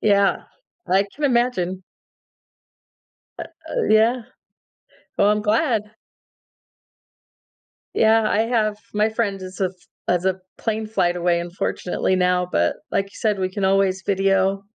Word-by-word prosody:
Yeah, 200 -2 +2 0.4
I 190 +2 +3
can 295 - -4
imagine. 235 -8 +1 1.6
Uh - - -4 0.3
uh, - - -1
yeah. 225 +3 +4 0.9
Well, 205 - +4
I'm 210 0 +1
glad. 225 +1 +2 2.1
Yeah, 220 0 +4
I 210 - +2
have 220 -3 0 0.2
my 210 +1 +3
friend 215 -3 -1
is 185 0 -9
a 190 - +3
f 180 - -7 0.4
as 180 0 +1
a 190 0 0 0.2
plane 220 -1 -2
flight 180 -5 +1
away, 175 -1 +1
unfortunately 175 +1 -2
now, 180 0 +2
but 85 0 +1
like 195 - +1
you 195 - -19
said, 210 -3 0
we 185 -1 0
can 195 +1 -3
always 190 0 +2
video. 195 0 +1
195 Hz, 135 wpm, -22 LUFS, 185-220 Hz, 2.1 s, yeah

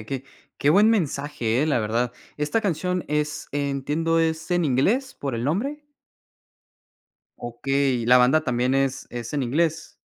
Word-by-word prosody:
de 110 - -11
que 135 +1 -4 0.3
Qué 145 - +3
buen 205 +6 +5
mensaje 145 - 0
eh, - - +1
la 150 - +2
verdad. 115 +3 -1 0.2
¿Esta 150 +10 0
canción 180 -2 -1
es 150 0 -2
entiendo, 145 +4 0
es 160 0 -1
en 175 -1 +2
inglés 195 - +1
por 135 -4 -4
el 115 +1 -3
nombre? 275 - -2 1.5
Okey, 130 +1 -1
¿y 115 - -4
la 125 - +7
banda 130 +6 +4
también 125 +1 0
es 135 -1 0
es 120 +1 -6
en 145 -2 -1
inglés? 160 +5 -1
145 Hz, 160 wpm, -24 LUFS, 125-165 Hz, 1.5 s, la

